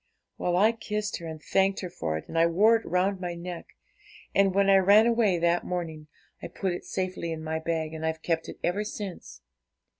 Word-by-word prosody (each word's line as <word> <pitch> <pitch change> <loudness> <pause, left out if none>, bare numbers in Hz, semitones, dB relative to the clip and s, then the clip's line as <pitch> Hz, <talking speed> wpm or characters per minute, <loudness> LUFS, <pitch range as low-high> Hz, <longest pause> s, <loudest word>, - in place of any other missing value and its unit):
'Well, 175 0 +1
I 215 +4 +5
kissed 210 -2 -3
her, 170 - -8
and 160 -1 -7
thanked 195 +4 +1
her 180 - -5
for 80 - -3
it, 80 - -9
and - - -9
I 165 0 +5
wore 205 +7 +5
it 225 - -1
round 185 +2 0
my 175 -1 -3
neck; 170 0 -7 0.7
and 195 0 +4
when 200 0 +3
I 195 0 +6
ran 200 +3 +6
away 230 -6 +3
that 170 +1 +1
morning, 160 -4 -4 0.3
I - - -5
put 190 -3 -3
it 175 - -7
safely 185 -3 -3
in 160 -1 -5
my 160 0 -2
bag, 160 -1 -2
and 160 0 -6
I've 160 0 -2
kept 165 -1 -1
it - - -8
ever 195 +4 0
since. 205 - -7
180 Hz, 215 wpm, -27 LUFS, 165-195 Hz, 0.7 s, I